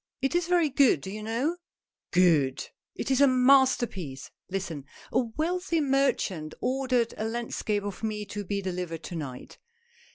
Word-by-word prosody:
It 270 Hz, +2 st, 0 dB
is 345 Hz, -1 st, +1 dB
very 350 Hz, -3 st, +3 dB
good, 270 Hz, -, +4 dB
do 190 Hz, -, -6 dB
you 215 Hz, +1 st, -6 dB
know? 240 Hz, +10 st, -1 dB, 0.2 s
" -, -, -65 dB
" -, -, -66 dB
Good! 160 Hz, -7 st, +3 dB, 0.3 s
It -, -, -3 dB
is 265 Hz, +1 st, +3 dB
a 280 Hz, -, +8 dB
masterpiece." 250 Hz, -, +2 dB
" -, -, -60 dB
Listen. 175 Hz, -7 st, -4 dB, 0.3 s
A -, -, +3 dB
wealthy 330 Hz, +8 st, -1 dB
merchant 265 Hz, -, 0 dB
ordered 255 Hz, -3 st, 0 dB
a 215 Hz, -, -2 dB
landscape 225 Hz, -2 st, -2 dB
of 200 Hz, -2 st, -6 dB
me 215 Hz, -1 st, -3 dB
to 205 Hz, 0 st, -5 dB
be 200 Hz, +1 st, -3 dB
delivered 180 Hz, -3 st, -4 dB
to 175 Hz, -, -6 dB
night. 135 Hz, -6 st, -7 dB
220 Hz, 170 wpm, -28 LUFS, 180-270 Hz, 0.3 s, a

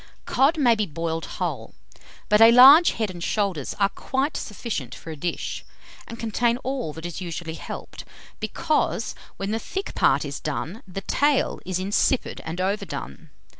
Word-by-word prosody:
231. -, -, -6 dB
Cod 320 Hz, +3 st, -1 dB
may 250 Hz, -6 st, +5 dB
be 215 Hz, -2 st, 0 dB
boiled 165 Hz, +1 st, -3 dB
whole; -, -, -4 dB, 0.5 s
but 210 Hz, +1 st, +4 dB
a 225 Hz, -, +10 dB
large 275 Hz, +8 st, +9 dB
head 220 Hz, -4 st, -2 dB
and 175 Hz, -2 st, -8 dB
shoulders 195 Hz, -, -1 dB
are 200 Hz, -1 st, +4 dB
quite 270 Hz, +8 st, -2 dB
sufficient 195 Hz, -, -5 dB
for 165 Hz, -, -9 dB
a -, -, -6 dB
dish, 170 Hz, +4 st, -4 dB, 0.4 s
and 230 Hz, -, -8 dB
contain 230 Hz, +1 st, 0 dB
all 260 Hz, -, -2 dB
that 160 Hz, +2 st, -9 dB
is 175 Hz, +2 st, -5 dB
usually 170 Hz, -2 st, -5 dB
helped, -, -, -8 dB, 0.4 s
because, 310 Hz, -2 st, -1 dB, 0.2 s
when 195 Hz, +1 st, -3 dB
the 225 Hz, -, -1 dB
thick 390 Hz, -, -5 dB
part -, -, +3 dB
is -, -, -5 dB
done, 200 Hz, +8 st, -4 dB
the 190 Hz, +1 st, -6 dB
tail 285 Hz, +7 st, +1 dB
is 185 Hz, -1 st, -1 dB
insipid 200 Hz, +7 st, 0 dB
and 165 Hz, +2 st, -5 dB
overdone. 195 Hz, +3 st, -4 dB
205 Hz, 170 wpm, -24 LUFS, 170-245 Hz, 0.5 s, a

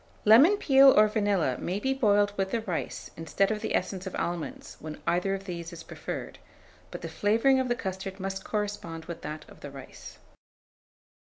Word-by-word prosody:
Lemon 275 Hz, -, +7 dB
peel 270 Hz, -6 st, +7 dB
or 215 Hz, -, +7 dB
vanilla 205 Hz, -, 0 dB
may 185 Hz, +3 st, -2 dB
be 265 Hz, +5 st, 0 dB
boiled 205 Hz, -5 st, +3 dB
with 195 Hz, -1 st, -1 dB
the 230 Hz, +3 st, -1 dB
rice 185 Hz, -7 st, -4 dB
instead 165 Hz, +5 st, 0 dB
of 215 Hz, -1 st, -2 dB
the -, -, -1 dB
essence 190 Hz, -1 st, -2 dB
of 190 Hz, -, -5 dB
almonds, 170 Hz, -2 st, -4 dB
when 155 Hz, 0 st, -8 dB
either 180 Hz, +3 st, +1 dB
of 195 Hz, 0 st, -8 dB
these 170 Hz, -3 st, -6 dB
is 170 Hz, -1 st, -9 dB
preferred; -, -, -7 dB, 0.5 s
but -, -, -8 dB
the -, -, -5 dB
flavouring 230 Hz, +6 st, +2 dB
of 260 Hz, -, 0 dB
the 240 Hz, -, +1 dB
custard 190 Hz, -1 st, -5 dB
must 195 Hz, 0 st, -4 dB
correspond 205 Hz, -6 st, -4 dB
with 170 Hz, -, -7 dB
that 155 Hz, +1 st, -7 dB
of -, -, -16 dB
the 145 Hz, -, -8 dB
rice. 135 Hz, -1 st, -11 dB
195 Hz, 185 wpm, -28 LUFS, 175-220 Hz, 0.5 s, Lemon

